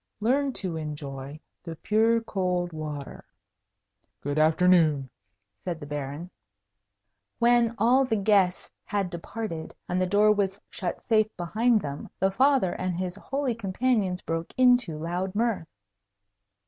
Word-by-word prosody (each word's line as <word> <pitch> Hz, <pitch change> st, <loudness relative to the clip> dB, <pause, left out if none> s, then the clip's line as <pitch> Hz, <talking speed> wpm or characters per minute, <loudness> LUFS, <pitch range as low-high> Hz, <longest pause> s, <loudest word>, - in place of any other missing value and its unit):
Learn 270 Hz, +6 st, +1 dB
to 180 Hz, -7 st, -3 dB
enjoy 145 Hz, -2 st, -6 dB, 0.2 s
the 165 Hz, -2 st, -7 dB
pure 225 Hz, +6 st, +2 dB
cold 180 Hz, -5 st, -1 dB
water." 150 Hz, -3 st, -6 dB, 1.0 s
"Good 145 Hz, +2 st, -1 dB
afternoon," 155 Hz, -4 st, +3 dB, 0.5 s
said 170 Hz, -3 st, -3 dB
the 145 Hz, -, -8 dB
Baron. 145 Hz, +4 st, -5 dB, 1.1 s
When 235 Hz, -1 st, +3 dB
all 245 Hz, +5 st, +4 dB
the 225 Hz, -, 0 dB
guests 195 Hz, -3 st, +2 dB
had 200 Hz, -3 st, -2 dB
departed 170 Hz, -1 st, -6 dB
and 180 Hz, +1 st, 0 dB
the 185 Hz, -, +1 dB
door 205 Hz, +3 st, +4 dB
was 200 Hz, -1 st, 0 dB
shut 180 Hz, -3 st, -4 dB
safe 215 Hz, -2 st, +3 dB
behind 215 Hz, +6 st, +2 dB
them, 145 Hz, -2 st, -6 dB
the 190 Hz, +1 st, +2 dB
Father 260 Hz, -3 st, +3 dB
and 185 Hz, -2 st, -3 dB
his 180 Hz, -1 st, -2 dB
holy 270 Hz, +4 st, -2 dB
companions 205 Hz, -3 st, 0 dB
broke 165 Hz, 0 st, -3 dB
into 245 Hz, -10 st, +4 dB
loud 175 Hz, +4 st, -3 dB
mirth. 220 Hz, -7 st, 0 dB
185 Hz, 130 wpm, -27 LUFS, 165-225 Hz, 1.1 s, all